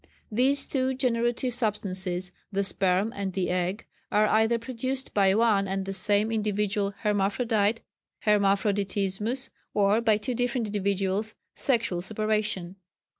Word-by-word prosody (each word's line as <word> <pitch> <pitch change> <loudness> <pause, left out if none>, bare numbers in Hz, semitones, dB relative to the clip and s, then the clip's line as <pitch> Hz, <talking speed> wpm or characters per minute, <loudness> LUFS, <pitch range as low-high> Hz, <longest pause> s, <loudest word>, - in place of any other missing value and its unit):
These 260 +6 +2
two 260 -1 -1
generative 240 0 0
substances, 190 -5 -1 0.2
the 200 0 0
sperm 195 +3 +2
and 195 -2 -3
the 185 -1 -1
egg, 180 +4 -1 0.3
are 210 +1 +4
either 220 +2 +3
produced 255 +3 -4
by 195 -1 +4
one 215 -3 +3
and 190 0 -2
the 195 - -4
same 205 +3 +2
individual 205 -2 -1
hermaphrodite 210 +2 +1 0.4
(Hermaphroditismus) 205 +3 +1 0.2
or 205 +2 +3
by 220 -3 +3
two 250 +4 -3
different 245 0 -1
individuals 200 +1 -1 0.2
(sexual 230 -9 0
separation). 210 -2 -1
210 Hz, 125 wpm, -27 LUFS, 195-230 Hz, 0.4 s, are